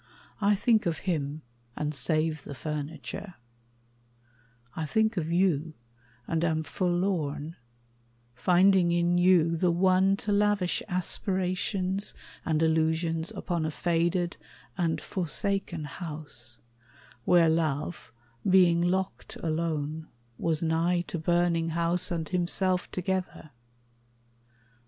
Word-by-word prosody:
I 205 0 +4
think 220 -1 +2
of 165 - 0
him, 155 -4 -2 0.3
And 150 0 -2
save 155 +2 -1
the 140 - -8
furniture; 155 +6 -5 1.4
I 160 -1 -3
think 220 +7 +2
of 165 -3 -2
you, 170 -3 +1 0.5
And 165 0 0
am 160 -1 +1
forlorn, 170 -3 -1 0.8
finding 180 +5 +4
in 175 +1 +2
you 175 -2 +4
the 175 +2 +2
one 185 +2 +3
To 210 - -3
lavish 205 -3 +2
aspirations 185 +1 -1 0.3
and 160 -1 +1
illusions 160 +1 +1
Upon 170 -3 -2
a 155 - 0
faded 170 +2 0 0.4
and 165 -3 0
forsaken 185 -1 -1
house 150 -6 -6 0.7
Where 170 +2 +5
love, 155 -4 -1 0.4
being 180 -2 +5
locked 185 +2 -1
alone, 160 -1 -2 0.3
was 160 -1 0
nigh 165 +2 +2
to 170 - -3
burning 170 0 +1
House 170 +2 0
and 165 -2 -2
himself 180 +1 0
together. 185 -4 -3
170 Hz, 105 wpm, -28 LUFS, 160-185 Hz, 1.4 s, Where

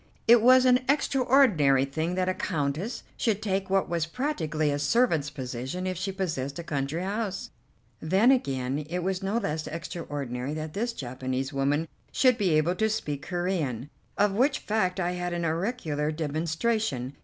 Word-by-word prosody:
It 235 0 +8
was 255 +2 +6
an 250 0 +6
extraordinary 245 - +4
thing 160 +6 -2
that 185 0 0
a 185 - +2
Countess 160 - -2
should 215 -4 +1
take 195 -2 -2
what 195 0 +2
was 165 -2 -1
practically 160 - -1
a 145 - -1
servant's 160 - +2
position 130 +5 -5
if 185 0 -1
she 190 +3 -3
possessed 160 -8 -3
a 170 - -5
country 150 +2 -2
house. 200 0 -3 0.5
Then, 190 +10 +4
again, 135 - 0
it 180 +1 -2
was 190 +1 -1
no 195 +4 -1
less 160 -8 -2
extraordinary 145 -5 -4
that 155 0 -5
this 235 +3 -2
Japanese 130 - -4
woman 145 +4 +1 0.2
should 255 -3 +3
be 195 -3 +2
able 160 +3 +2
to 220 +2 +2
speak 150 -10 -3
Corean, 165 -8 -2 0.3
of 205 0 +3
which 270 +6 +2
fact 195 -3 -1
I 175 -1 0
had 180 0 -3
had 170 -1 -2
auricular 160 -3 -1
demonstration. 155 - -1
170 Hz, 165 wpm, -27 LUFS, 145-205 Hz, 0.5 s, It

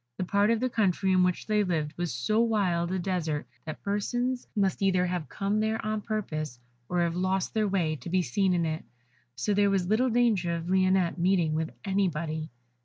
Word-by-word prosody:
The - - -1
part 200 +3 +2
of 230 -1 +2
the 255 - +1
country 195 -5 +1
in 185 -1 +4
which 180 -1 +1
they 210 -1 +2
lived 155 -5 -2
was 175 -1 -2
so 125 - 0
wild 185 -7 +1
a 190 - 0
desert 170 -5 -2 0.2
that 155 - -7
persons 245 +5 -1
must 195 -2 +1
either 185 -2 +3
have 175 -3 -3
come 200 +1 -1
there 220 +1 0
on 215 0 -1
purpose, 155 - -3 0.3
or 180 -1 +1
have 170 -1 0
lost 185 +1 0
their 215 -1 +1
way, 170 -6 0
to 170 - -8
be 185 +1 +2
seen 180 +8 +1
in 170 -1 +1
it, 155 0 -3 0.5
so 130 +11 0
there 200 0 +3
was 195 -2 +1
little 220 +7 +2
danger 220 -8 +2
of 165 0 -5
Lionette 185 -2 +2
meeting 175 -3 +2
with 160 +1 -1 0.2
anybody. 165 -5 -1
185 Hz, 200 wpm, -28 LUFS, 170-205 Hz, 0.5 s, in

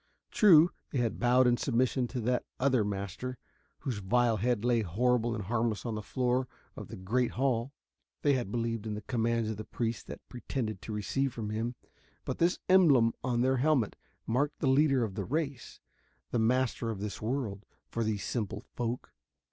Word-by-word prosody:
True, 175 -5 +7 0.2
they - - -3
had 120 -3 0
bowed 125 +1 +4
in 120 -1 +4
submission 125 0 +1
to 125 - -4
that 125 +2 +1 0.2
other 130 -4 +3
master, 100 +5 -4 0.4
whose 120 -6 -3
vile 115 +3 +2
head 120 +1 0
lay 120 -2 +3
horrible 120 +4 +1
and 105 - -4
harmless 110 +2 -1
on 115 - -2
the 105 - -3
floor 125 +4 0 0.3
of - - -8
the - - -8
great 115 +7 0
hall 125 0 0 0.5
they 145 - +4
had 120 -7 -1
believed 115 -2 -2
in 105 - -2
the 105 - -6
commands 115 -1 0
the 110 - -6
priests 115 0 -3
had - - -6
pretended 120 -3 -4
to - - -7
receive 125 +5 -1
from 105 -2 -4
him 115 +3 -2 0.5
but - - -3
this 170 +2 +3
emblem 145 -12 +6
on 120 -2 +1
the 130 +1 +3
helmet 130 -5 +2 0.3
marked 140 +6 0
the - - -2
leader 135 -1 +4
of 105 -4 -3
the 100 - -3
race, 140 - -3 0.5
the 120 - +1
master 120 0 +1
of 110 -4 -4
this 100 -1 -5
world, 110 -4 -2 0.2
for 115 - -2
these 110 -2 -1
simple 105 -2 -3
folk. 120 0 -3
120 Hz, 180 wpm, -31 LUFS, 110-130 Hz, 0.5 s, True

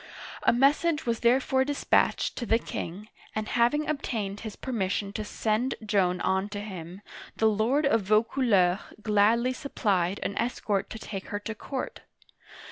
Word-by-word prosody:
A - - +4
message 290 +5 +2
was 235 -1 0
therefore 260 +2 +3
dispatched 285 +1 +1
to 240 - -3
the 225 - +4
king, 205 -2 -6 0.3
and 215 0 -2
hav 235 +3 +3
ing 300 +1 -1
obtained 215 -9 -2
his 220 -1 -7
permission 200 -4 -2
to 215 - -3
send 220 +4 -1
Joan 190 -4 +2
on 190 +2 0
to 205 -1 -5
him, 190 -2 -8 0.3
the 220 - +1
lord 220 +8 +2
of 225 -5 +3
Vaucouleurs 215 -3 +3 0.2
gladly 220 +4 +3
supplied 200 - 0
an 200 - -3
escort 220 -4 -1
to - - -6
take 195 -3 -7
her 205 - -3
to 220 - -4
court. 260 +5 -5
215 Hz, 155 wpm, -28 LUFS, 200-250 Hz, 0.3 s, A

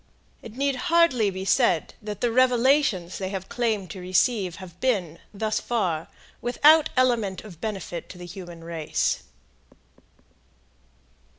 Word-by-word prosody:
It 225 +1 -11
need 275 -1 0
hardly 330 -11 +4
be 190 0 -5
said 195 - +2
that 210 -2 -6
the 240 - +1
revelations 250 - +2
they 190 -1 -3
have 190 -1 -5
claimed 215 -7 -1
to 190 - -7
receive 185 +1 +1
have 180 -2 -12
been, 190 -11 0
thus 215 +1 -1
far, 180 -9 -1 0.3
without 300 +5 +5
element 235 -7 +1
of 185 -7 -12
benefit 190 -5 -5
to 180 - -10
the 175 - -9
human 175 -2 -9
race. 165 -2 -1
205 Hz, 130 wpm, -25 LUFS, 180-245 Hz, 0.3 s, without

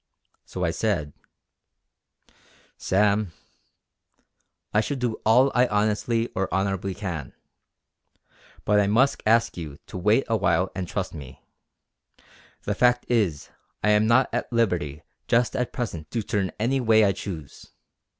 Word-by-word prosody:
So 90 - -5
I 85 - +1
said: 85 -6 -1 1.6
"Sam, 100 -1 +1 1.4
I 105 - +4
shall 140 +5 -3
do 120 -3 -2
all 125 +5 +5
I 125 +1 +4
honestly 110 +2 0
or 95 0 -2
honourably 95 0 -1
can. 90 - -5 1.3
But 105 0 +3
I 100 - +2
must 130 +7 +2
ask 115 -1 +3
you 75 -4 -7
to 95 - -7
wait 105 +8 +3
a 115 - +1
while 95 -2 +1
and 95 -2 -4
trust 95 +1 -4
me. 65 -5 -11 1.2
The 105 - -1
fact 125 +3 +2
is 100 -12 0 0.3
I 105 - +4
am 105 +1 +3
not 120 +3 +4
at - - -2
liberty 90 -11 0 0.2
just 120 +2 +2
at 125 -2 -1
present 85 -10 -5
to 115 -2 -2
turn 100 -4 -1
any 130 +5 +1
way 110 -2 +5
I 100 - +3
choose. 85 -7 -8
105 Hz, 140 wpm, -25 LUFS, 90-115 Hz, 1.6 s, all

